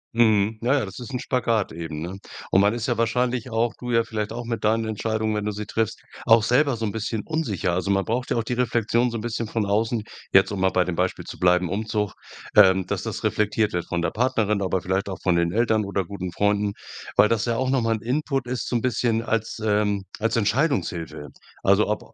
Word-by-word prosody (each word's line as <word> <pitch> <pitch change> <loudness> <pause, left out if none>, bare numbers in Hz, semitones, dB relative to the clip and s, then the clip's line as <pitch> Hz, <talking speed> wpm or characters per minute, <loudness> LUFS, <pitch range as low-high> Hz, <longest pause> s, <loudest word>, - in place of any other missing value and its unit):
Mhm. 110 -2 +3
Na 125 +5 +2
ja, 130 - 0
das 95 +3 -9
ist 125 +1 -8
'n 130 - -1
Spagat 115 -6 0
eben, 80 -2 -6
ne? 90 +4 -6 0.3
Und 95 - +5
man 100 +3 +3
ist 120 -1 -3
ja 120 -3 -1
wahrscheinlich 125 +1 0
auch, 115 -1 0
du 125 - -6
ja 115 -1 +3
vielleicht 110 -2 -4
auch 120 +1 -5
mit 115 -1 -3
deinen 110 +1 +2
Entscheidungen, 110 0 -1
wenn 105 -1 -2
du 105 - 0
sie 105 +1 -5
triffst, 110 +1 -2 0.2
auch 115 -1 +6
selber 135 +3 +3
so 115 - -2
'n 105 - -1
bisschen 110 0 -3
unsicher. 115 - -1
Also, 90 +2 -1
man 95 -1 +2
braucht 125 +3 -2
ja - - 0
auch 115 - +1
die 120 - -3
Reflexion 120 0 +1
so 115 - -4
'n - - -5
bisschen 115 0 -3
von 110 0 -1
außen, 110 +2 0 0.3
jetzt, 95 +1 +5
um 100 - -3
mal 95 - +4
bei 90 -1 +2
dem 90 -1 -3
Beispiel - - -1
zu - - -9
bleiben 90 0 +3
Umzug, 105 +2 -2 0.4
ähm, 95 -2 +6
dass - - -2
das - - -5
reflektiert 105 0 +1
wird 90 -1 -1
von 85 -1 -2
der 85 - 0
Partnerin, 105 -4 +1
aber 95 -1 0
vielleicht 95 +2 -1
auch 95 - -4
von 90 -2 +3
den 85 0 +1
Eltern 110 0 +2
oder 100 -1 -2
guten 95 0 -5
Freunden, 105 +2 +1 0.4
weil 105 - +6
das 115 0 0
ja 115 -1 0
auch 130 +1 0
noch 135 -2 +2
mal 115 0 +1
'n 110 - -7
Input 135 +1 -1
ist 125 0 -3
so - - -2
'n 120 - +1
bisschen 115 -2 +1
als, 115 -1 -2
ähm, 105 -2 +1
als 115 +1 0
Entscheidungshilfe. 100 - -1 0.3
Also 100 +2 +4
ob 105 - -4
110 Hz, 240 wpm, -24 LUFS, 100-115 Hz, 0.4 s, auch